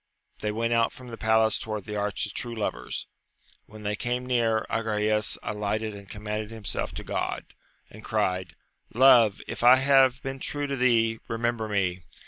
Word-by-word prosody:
They 105 - -2
went 115 +2 0
out 115 -1 +3
from 125 -1 -12
the 115 - -6
palace 110 0 +3
towards 105 -2 -5
the 105 -1 -5
Arch 105 0 -1
of 105 - -8
True 120 -1 -4
Lovers. 110 - -3 0.6
When 110 0 -12
they 105 0 -1
came 125 +2 -2
near, 115 -3 +1
Agrayes 105 -1 0
alighted 105 +1 -2
and 100 -2 -11
commended 105 0 -4
himself 110 -3 -3
to - - -5
Grod, - - -3 0.4
and 110 +1 -14
cried. 95 -5 -1 0.4
Love, 120 -5 +6
if - - -6
I 125 +2 +9
have 135 -1 +4
been 135 0 -5
true 145 +2 -3
to 140 -1 -2
thee, 115 -3 +2
remember 115 -1 -1
me 95 -3 0
110 Hz, 170 wpm, -27 LUFS, 105-120 Hz, 0.6 s, I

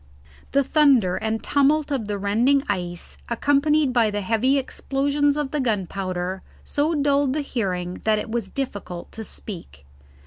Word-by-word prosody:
The 280 +1 +3
thunder 265 - +4
and 220 0 -2
tumult 290 +1 +2
of 250 -7 -1
the 205 -1 -2
rending 235 +8 +2
ice 175 -3 -4
accompanied 285 +3 +2
by 235 -3 +4
the 205 0 -2
heavy 230 +7 +2
explosions 280 +2 0
of 295 -3 -2
the 300 - -1
gunpowder 190 -5 -2 0.2
so 305 +3 0
dulled 285 -2 +2
the 305 - 0
hearing 185 -9 -3
that 215 -1 +3
it 220 - -4
was 235 0 -2
difficult 205 -10 -5
to 225 - -7
speak. 165 - -9
235 Hz, 150 wpm, -23 LUFS, 200-280 Hz, 0.2 s, thunder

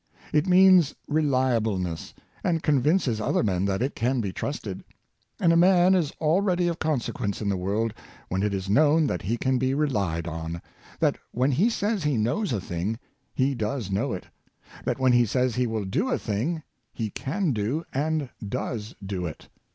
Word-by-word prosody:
It 150 +4 +3
means 185 -4 +6
reliableness, 115 - 0 0.3
and 165 -3 0
convinces 145 - +2
other - - +1
men 95 -3 +1
that 100 +3 0
it 135 - -1
can 125 +3 0
be 100 -5 -2
trusted. - - -4 0.6
And 165 -1 +4
a - - +4
man 180 +1 +5
is 170 -6 +2
al 160 +5 +3
ready 180 -3 +1
of 170 -1 -2
consequence 125 -9 -1
in 105 - -1
the 100 - +1
world 105 +5 -1 0.3
when 95 +1 -1
it 105 0 +1
is 95 -1 -3
known 150 +8 +4
that 90 -11 -1
he 115 +5 -1
can 130 +1 +1
be 130 +1 +1
relied 100 - 0
on 80 +1 -4 0.2
— - - -23
that - - +2
when 130 +4 +1
he 175 - +3
says 210 -4 -1
he 150 -4 +1
knows 120 - 0
a 110 - 0
thing, 95 +4 -3 0.4
he 135 +1 +2
does 110 -3 -3
know 115 +7 0
it; 95 - -5 0.6
that 120 - 0
when 130 -1 +3
he 120 0 +5
says 125 +2 +1
he 125 +1 +1
will 110 -3 -2
do 100 - 0
a - - +1
thing, 135 +10 -2 0.3
he 110 -3 -4
can 165 - -1
do, 115 +10 -1
and 150 0 -1
does 110 0 -4
do 95 -3 -3
it. 80 - -10
125 Hz, 190 wpm, -26 LUFS, 100-155 Hz, 0.6 s, means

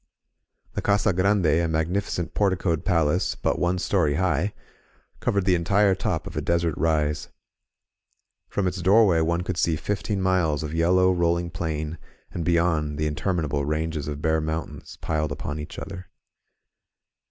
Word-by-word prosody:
The - - -2
Casa 100 0 +2
Grande, 95 +1 +2
a 80 +2 +3
magnificent 85 +1 -1
porticoed 95 -5 +1
palace 85 -2 +1
but - - -1
one 90 +1 +1
story 85 -5 +1
high, 90 +2 +1 0.7
covered 100 -2 0
the 95 - +4
entire 95 +4 +3
top - - -2
of - - -8
a - - -1
desert 85 -1 +1
rise. 75 -2 0 1.2
From 100 - -1
its 90 0 -2
doorway 95 -2 +5
one 85 +2 +1
could 90 - -3
see 85 -2 +2
fifteen 100 +4 -2
miles 90 -6 +1
of 75 0 -5
yellow, 90 +3 +3
rolling 85 0 0
plain, 80 -1 -3 0.3
and, 85 - -4
beyond, 80 -3 +1
the 75 - 0
interminable 75 -2 -1
ranges 75 0 -2
of 75 0 -5
bare 80 -1 +2
mountains 80 +1 -5
piled 75 -1 -1
upon 75 +1 -4
each 75 - -8
other. 95 -1 -7
85 Hz, 150 wpm, -25 LUFS, 80-95 Hz, 1.2 s, doorway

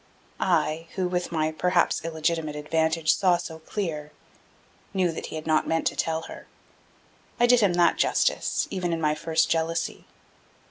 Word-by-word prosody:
I, 165 -2 +1
who 185 -2 0
with 180 0 -2
my 155 -1 0
perhaps 180 +2 +1
illegitimate 160 -1 -1
advantage 160 +1 +1
saw 180 -3 +3
so 165 -2 -7
clear, 160 -4 -4 0.8
knew 185 -3 +2
that 165 - -6
he - - -7
had 155 - -6
not 155 -1 +2
meant 165 0 0
to - - +1
tell 160 0 -1
her: - - -10 0.9
I 240 - +6
did 245 0 +5
him 200 -5 +3
that 175 0 +3
justice, - - +1
even 175 -2 -1
in 165 - -1
my 150 -1 +2
first 160 +1 0
jealousy. 165 0 -1
165 Hz, 165 wpm, -26 LUFS, 160-175 Hz, 0.9 s, I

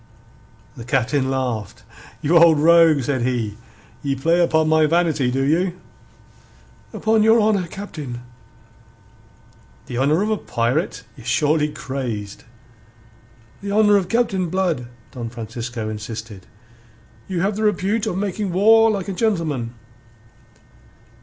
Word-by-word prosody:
The 115 - -9
Captain 130 +2 0
laughed. 125 -5 -3 0.4
"You 160 +4 +2
old 165 -2 +7
rogue," 165 -2 +5
said 130 0 -1
he. 120 -4 -1 0.5
"Ye 140 -1 -1
play 165 +6 +1
upon 160 -2 +2
my 155 0 +4
vanity, 160 -5 +1
do 135 +2 -1
you?" 175 +5 0 1.1
"Upon 220 0 +1
your 225 +2 +5
honour, 210 -4 +1
Captain." 150 -11 -7 1.6
"The 120 - -4
honour 150 +8 +2
of 215 - -1
a 215 - +1
pirate? 120 +2 -2
Ye're 125 - -13
surely 150 +3 +2
crazed!" 120 -9 -6 1.2
"The 200 0 -5
honour 210 0 +4
of 190 -3 +1
Captain 195 -7 0
Blood," 170 -9 -1 0.2
Don 120 -4 -6
Francisco 115 0 -6
insisted. 110 -1 -7 0.8
"You 185 -3 -2
have 200 +2 0
the 215 - -4
repute 210 +1 0
of 185 - -2
making 200 0 -2
war 225 +5 +5
like 200 -3 -2
a 195 - -3
gentleman." 160 - -1
160 Hz, 125 wpm, -21 LUFS, 125-195 Hz, 1.6 s, old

